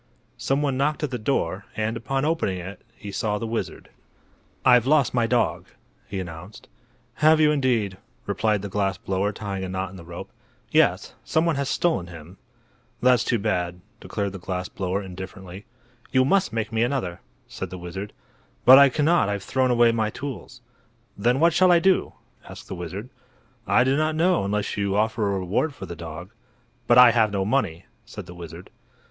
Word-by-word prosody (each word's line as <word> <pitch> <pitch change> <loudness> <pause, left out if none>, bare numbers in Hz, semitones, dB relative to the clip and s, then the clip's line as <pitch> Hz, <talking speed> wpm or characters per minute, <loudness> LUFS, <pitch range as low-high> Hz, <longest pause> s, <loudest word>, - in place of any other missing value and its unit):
Some 135 +2 0
one 135 -3 0
knocked 150 +3 0
at 145 - -1
the 125 - -3
door, 100 -5 -1
and, 110 +1 -1
upon 135 +4 -2
opening 155 - 0
it, 95 +3 -8
he 105 -2 -9
saw 105 +1 -1
the 115 - -4
wizard. 115 0 -5 0.7
"I've 125 -1 +5
lost 145 -2 +3
my 120 -2 +2
dog," 120 -1 0 0.4
he 100 -1 -4
announced. 90 +3 -9 0.5
"Have 155 +1 +5
you, 155 -1 +5
indeed?" 120 -9 0 0.3
replied 105 -2 0
the - - -3
glass 100 -1 -1
blower 95 +2 -1
tying 100 -2 -5
a 95 - -4
knot 95 0 -3
in 95 - -11
the 85 - -11
rope. 85 +1 -9 0.4
"Yes; - - +2
some 160 +1 +1
one 165 -2 +1
has 140 -1 -2
stolen 160 - 0
him." 85 +2 -12 0.6
"That's 125 -2 +4
too 120 - +1
bad," 90 -4 -2 0.2
declared 100 -1 -3
the 95 - -8
glass 90 0 -4
blower, 95 +1 -3
indifferently. 95 +1 -9 0.5
"You 130 -1 +4
must 185 - +2
make 110 -1 -3
me 110 - +1
another," 120 -9 -1 0.3
said 95 - -6
the 90 - -7
wizard. 95 +4 -7 0.5
"But 130 +2 +10
I 140 0 +7
cannot; 150 -4 +2
I've 100 -1 -3
thrown 130 -1 +1
away 120 -1 +4
my 110 -2 0
tools." 125 0 -8 0.5
"Then 120 +6 +1
what 165 +1 +4
shall 185 +1 +5
I 175 - +6
do?" 185 +2 +2 0.4
asked - - -11
the - - -6
wizard. 95 +6 -6 0.6
"I 125 - +4
do 130 +1 +2
not 155 +1 0
know, 175 - +2
unless 105 +1 -2
you 100 -1 0
offer 110 0 +1
a 100 - 0
reward 100 - -1
for - - -8
the 85 - -7
dog." 85 +3 -8 0.6
"But 120 - +5
I 125 -1 +9
have 110 -3 +2
no 95 -1 -1
money," 100 -8 -1 0.2
said - - -9
the 90 - -11
wizard. 85 -3 -10
110 Hz, 190 wpm, -24 LUFS, 95-130 Hz, 0.7 s, But